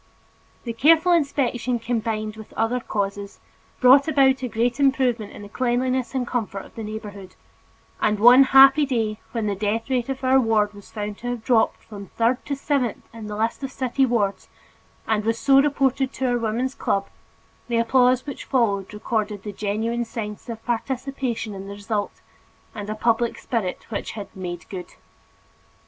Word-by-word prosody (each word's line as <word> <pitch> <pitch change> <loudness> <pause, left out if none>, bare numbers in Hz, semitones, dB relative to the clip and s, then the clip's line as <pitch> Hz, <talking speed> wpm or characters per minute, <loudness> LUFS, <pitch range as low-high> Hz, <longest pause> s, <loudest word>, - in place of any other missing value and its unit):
The 235 - -4
careful 325 +8 +4
inspection 255 -6 +1
combined 220 -2 -2
with 220 -1 -12
other 225 +3 0
causes, 200 -3 -4 0.4
brought 265 +4 +6
about 270 -3 +3
a 255 - -2
great 240 +3 -1
improvement 255 -6 +1
in - - -10
the - - -9
cleanliness 255 +3 -1
and 255 -2 0
comfort 220 -5 -3
of - - -17
the 225 - -7
neighborhood 210 -3 -8 0.7
and 210 -1 +1
one 250 +5 +8
happy 270 +2 +7
day, 225 -6 -1
when 230 -3 -2
the 205 - 0
death 215 +5 -2
rate 250 -1 0
of 270 0 -4
our 260 +1 +5
ward 215 -3 +2
was 205 -1 -14
found 210 -1 -5
to 245 - -6
have 245 -2 -3
dropped 230 -1 +2
from 200 -2 -10
third 235 +6 0
to 285 - -1
seventh 275 -4 -2
in 225 -2 -8
the 210 - -5
list 225 +4 -1
of 270 - -4
city 265 0 0
wards 210 -5 -1 0.6
and 215 -1 0
was 225 +1 0
so 275 +2 +5
reported 270 -2 +1
to 265 - -3
our 245 - +1
Woman's 235 +4 -1
Club, 195 -6 -1 0.6
the 235 -1 0
applause 250 +2 +3
which 280 -3 -7
followed 200 -7 0
recorded 210 -2 -2
the 210 - -6
genuine 220 +4 -2
sense 220 -2 -7
of 225 -1 -7
participation 245 -1 -3
in 195 0 -8
the 200 - -7
result, 205 0 -4 0.5
and 205 -1 -6
a 215 - -2
public 230 +1 +1
spirit 225 -8 -3
which 205 - -4
had 205 -3 -8
"made 180 -2 -6
good." 185 -2 -8
230 Hz, 175 wpm, -23 LUFS, 210-260 Hz, 0.7 s, one